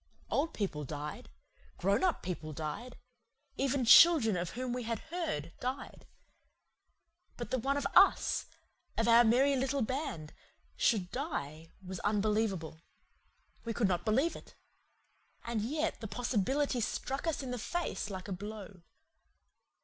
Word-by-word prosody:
Old 310 Hz, +4 st, 0 dB
people 175 Hz, -8 st, -2 dB
died. 150 Hz, +1 st, -6 dB, 0.5 s
Grown 200 Hz, -, +1 dB
up 365 Hz, -2 st, +1 dB
people 160 Hz, -4 st, -5 dB
died. 160 Hz, -, -5 dB, 0.6 s
Even 270 Hz, -1 st, 0 dB
children 245 Hz, -, +8 dB
of 175 Hz, -1 st, -2 dB
whom 250 Hz, +1 st, -3 dB
we 250 Hz, -, -2 dB
had 230 Hz, -1 st, -2 dB
heard 320 Hz, -, -4 dB
died. 255 Hz, +2 st, -5 dB, 1.3 s
But 240 Hz, 0 st, -6 dB
that 260 Hz, -, +1 dB
one 275 Hz, +4 st, 0 dB
of 285 Hz, -, -2 dB
US 390 Hz, +2 st, +5 dB, 0.5 s
of 225 Hz, -, +1 dB
our 235 Hz, +1 st, +7 dB
merry 260 Hz, +5 st, +4 dB
little 265 Hz, 0 st, 0 dB
band 220 Hz, -, -4 dB, 0.4 s
should 190 Hz, -6 st, +1 dB
die 165 Hz, -, -4 dB, 0.2 s
was 185 Hz, -1 st, -6 dB
unbelievable. 205 Hz, -6 st, 0 dB, 0.8 s
We 230 Hz, -1 st, -4 dB
could 225 Hz, -, +2 dB
not 175 Hz, -2 st, 0 dB
believe 260 Hz, +10 st, +1 dB
it. -, -, -13 dB, 0.9 s
And 235 Hz, -2 st, -2 dB
yet 300 Hz, +8 st, -2 dB
the 220 Hz, -, -4 dB
possibility 245 Hz, +4 st, 0 dB
struck 270 Hz, +7 st, -3 dB
us 315 Hz, -3 st, -1 dB
in 255 Hz, -, -5 dB
the 250 Hz, -, -3 dB
face 345 Hz, -5 st, -3 dB
like 190 Hz, -1 st, -6 dB
a -, -, -6 dB
blow. 200 Hz, -1 st, -8 dB
230 Hz, 140 wpm, -32 LUFS, 190-270 Hz, 1.3 s, children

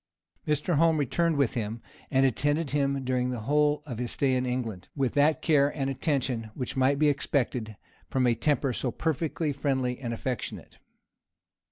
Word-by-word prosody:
Mr. 150 Hz, +2 st, +1 dB
Home 165 Hz, 0 st, +4 dB
returned 160 Hz, +3 st, +1 dB
with 140 Hz, -5 st, +2 dB
him, 115 Hz, -2 st, -3 dB, 0.3 s
and 135 Hz, -1 st, +3 dB
attended 145 Hz, +4 st, +1 dB
him 140 Hz, -2 st, 0 dB
during 125 Hz, -1 st, 0 dB
the 125 Hz, -3 st, -3 dB
whole 150 Hz, +4 st, +2 dB
of 120 Hz, -6 st, -6 dB
his 125 Hz, -1 st, -2 dB
stay 135 Hz, +2 st, +1 dB
in 125 Hz, 0 st, 0 dB
England, 115 Hz, -7 st, -3 dB
with 135 Hz, -4 st, 0 dB
that 150 Hz, +2 st, +3 dB
care 145 Hz, -3 st, +4 dB
and 135 Hz, -2 st, -2 dB
attention 130 Hz, -5 st, -1 dB
which 125 Hz, -, -4 dB
might 135 Hz, +1 st, +3 dB
be 150 Hz, +1 st, +3 dB
expected 125 Hz, -6 st, 0 dB, 0.3 s
from 130 Hz, -1 st, +1 dB
a 120 Hz, -, +4 dB
temper 135 Hz, +1 st, +1 dB
so 125 Hz, -, -2 dB
perfectly 160 Hz, +2 st, -1 dB
friendly 130 Hz, -3 st, -1 dB
and 120 Hz, -3 st, -4 dB
affectionate. 120 Hz, +1 st, -5 dB
135 Hz, 170 wpm, -28 LUFS, 125-145 Hz, 0.3 s, Home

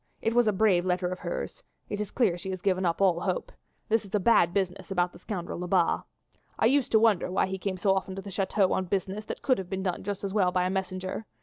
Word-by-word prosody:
It 225 Hz, -, 0 dB
was 240 Hz, -1 st, +4 dB
a -, -, +5 dB
brave 190 Hz, -3 st, +3 dB
letter 180 Hz, 0 st, 0 dB
of 185 Hz, 0 st, -5 dB
hers; -, -, -5 dB, 0.3 s
it 205 Hz, -, -3 dB
is 210 Hz, -, -3 dB
clear 215 Hz, -9 st, +2 dB
she 180 Hz, +2 st, -6 dB
has 185 Hz, -1 st, -4 dB
given 185 Hz, -2 st, +2 dB
up 170 Hz, +3 st, -1 dB
all 180 Hz, -3 st, +3 dB
hope. -, -, -2 dB, 0.4 s
This 225 Hz, 0 st, +2 dB
is 200 Hz, 0 st, -5 dB
a -, -, +3 dB
bad 185 Hz, -4 st, +4 dB
business 190 Hz, 0 st, -2 dB
about 180 Hz, -2 st, 0 dB
the -, -, -13 dB
scoundrel 175 Hz, -3 st, -5 dB
Lebat. 180 Hz, -1 st, +1 dB, 0.5 s
I -, -, +2 dB
used 270 Hz, +2 st, +3 dB
to 220 Hz, -, +7 dB
wonder 215 Hz, -6 st, +3 dB
why 185 Hz, -, +2 dB
he 190 Hz, 0 st, -4 dB
came 185 Hz, -1 st, -2 dB
so 195 Hz, +1 st, +3 dB
often 190 Hz, 0 st, -2 dB
to 195 Hz, -, -5 dB
the 200 Hz, -, -8 dB
chateau 195 Hz, 0 st, +1 dB
on 190 Hz, -, 0 dB
business 195 Hz, +3 st, -2 dB
that -, -, -6 dB
could 255 Hz, -5 st, +3 dB
have 185 Hz, -2 st, -6 dB
been 190 Hz, -1 st, -3 dB
done 180 Hz, -3 st, -2 dB
just 200 Hz, 0 st, -4 dB
as 195 Hz, -1 st, -3 dB
well 190 Hz, -4 st, +3 dB
by 180 Hz, 0 st, +1 dB
a 185 Hz, -, 0 dB
messenger. 190 Hz, +2 st, -3 dB
190 Hz, 265 wpm, -28 LUFS, 180-205 Hz, 0.5 s, to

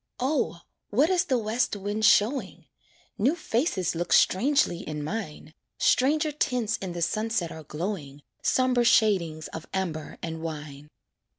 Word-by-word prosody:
O! 260 Hz, -, 0 dB, 0.3 s
what 280 Hz, -, +3 dB
is 360 Hz, -2 st, +2 dB
the 260 Hz, -, +1 dB
west 225 Hz, +1 st, 0 dB
wind 205 Hz, +2 st, -2 dB
showing? 230 Hz, +6 st, +2 dB, 0.5 s
New 265 Hz, +10 st, +3 dB
faces 235 Hz, -, -1 dB
look 175 Hz, +1 st, -3 dB
strangely 245 Hz, -, +3 dB
in 150 Hz, -5 st, -5 dB
mine, 155 Hz, -4 st, -5 dB, 0.2 s
Stranger 300 Hz, +4 st, +2 dB
tints 250 Hz, -7 st, 0 dB
in 185 Hz, -3 st, -5 dB
the 170 Hz, -1 st, -2 dB
sunset 215 Hz, -3 st, -1 dB
are 160 Hz, -, -8 dB
glowing, 150 Hz, -3 st, -5 dB, 0.2 s
Somber 255 Hz, -2 st, +2 dB
shadings 180 Hz, -9 st, +2 dB
of 160 Hz, -, -8 dB
amber 165 Hz, -5 st, -3 dB
and 160 Hz, -1 st, -4 dB
wine. 150 Hz, -2 st, -7 dB
205 Hz, 135 wpm, -27 LUFS, 160-250 Hz, 0.5 s, what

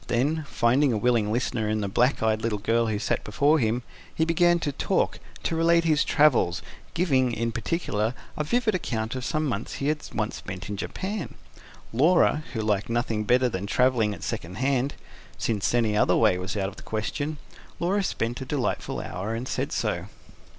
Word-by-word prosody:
Then, 145 Hz, +6 st, 0 dB
finding 130 Hz, +4 st, +3 dB
a 110 Hz, -, +1 dB
willing 110 Hz, -1 st, +2 dB
listener 115 Hz, -2 st, -1 dB
in 110 Hz, 0 st, 0 dB
the 100 Hz, -, -1 dB
black 120 Hz, +5 st, +2 dB
eyed 110 Hz, -1 st, +2 dB
little 110 Hz, -2 st, 0 dB
girl 115 Hz, +3 st, +1 dB
who 110 Hz, -1 st, 0 dB
sat 105 Hz, -, -1 dB
before 145 Hz, +9 st, +3 dB
him, 120 Hz, 0 st, 0 dB, 0.3 s
he 160 Hz, -, 0 dB
began 175 Hz, +1 st, +4 dB
to 145 Hz, -, -1 dB
talk, -, -, 0 dB, 0.2 s
to 165 Hz, -, 0 dB
relate 170 Hz, +1 st, +4 dB
his 155 Hz, -2 st, +3 dB
travels, 135 Hz, -, +3 dB, 0.3 s
giving, 135 Hz, -8 st, +2 dB
in 115 Hz, 0 st, -1 dB
particular, 115 Hz, -3 st, -1 dB, 0.2 s
a 150 Hz, -, -1 dB
vivid 225 Hz, +7 st, +1 dB
account 115 Hz, -10 st, -2 dB
of 130 Hz, -1 st, -4 dB
some 155 Hz, +3 st, 0 dB
months 115 Hz, -6 st, -3 dB
he 140 Hz, -, -1 dB
had 155 Hz, 0 st, 0 dB
once 110 Hz, -1 st, -2 dB
spent 95 Hz, -1 st, -7 dB
in 105 Hz, -, -3 dB
Japan. 190 Hz, -, -4 dB, 0.6 s
Laura, 155 Hz, +3 st, +4 dB
who 110 Hz, -, -1 dB
liked 105 Hz, 0 st, 0 dB
nothing 115 Hz, -2 st, -1 dB
better 125 Hz, +4 st, +4 dB
than 100 Hz, -3 st, -3 dB
travelling 125 Hz, -2 st, +2 dB
at -, -, -11 dB
second 85 Hz, +3 st, -4 dB
hand 135 Hz, +3 st, 0 dB, 0.4 s
since 105 Hz, -4 st, 0 dB
any 115 Hz, -3 st, +2 dB
other -, -, +4 dB
way 110 Hz, -5 st, +4 dB
was 95 Hz, +3 st, -4 dB
out 95 Hz, -1 st, 0 dB
of 95 Hz, -, -14 dB
the -, -, -10 dB
question 125 Hz, +8 st, -3 dB, 0.4 s
Laura 190 Hz, +4 st, +1 dB
spent 120 Hz, -9 st, -2 dB
a -, -, -2 dB
delightful 135 Hz, -2 st, -2 dB
hour, 100 Hz, +5 st, -4 dB
and 120 Hz, +3 st, -4 dB
said -, -, -2 dB
so. -, -, -1 dB
120 Hz, 190 wpm, -26 LUFS, 110-150 Hz, 0.6 s, began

